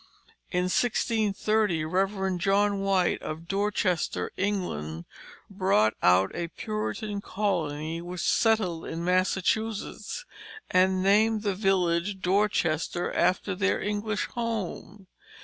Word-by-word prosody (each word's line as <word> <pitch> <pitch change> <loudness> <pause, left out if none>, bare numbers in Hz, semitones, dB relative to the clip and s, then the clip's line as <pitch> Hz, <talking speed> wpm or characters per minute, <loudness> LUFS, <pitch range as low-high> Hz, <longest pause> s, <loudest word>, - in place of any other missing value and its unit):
In 180 -1 0
1630, 210 -3 +1
Rev. 190 +2 0
John 200 +2 +2
White 195 -2 +1
of 160 +2 -6
Dorchester, 190 - 0
England, 85 - -2 0.4
brought 185 - +2
out 90 +2 +4
a 170 - -2
Puritan 215 +1 -4
colony 165 -6 -2
which 175 0 -6
settled 215 -8 +2
in 165 +1 -4
Massachusetts, 195 - -1 0.5
and 185 0 +3
named 215 +2 +3
the 200 -2 +1
village 190 -1 +1
Dorchester, 180 -3 0
after 185 +2 +1
their 195 +2 +1
English 210 +1 -2
home. 220 -4 -4
190 Hz, 100 wpm, -27 LUFS, 175-210 Hz, 0.5 s, out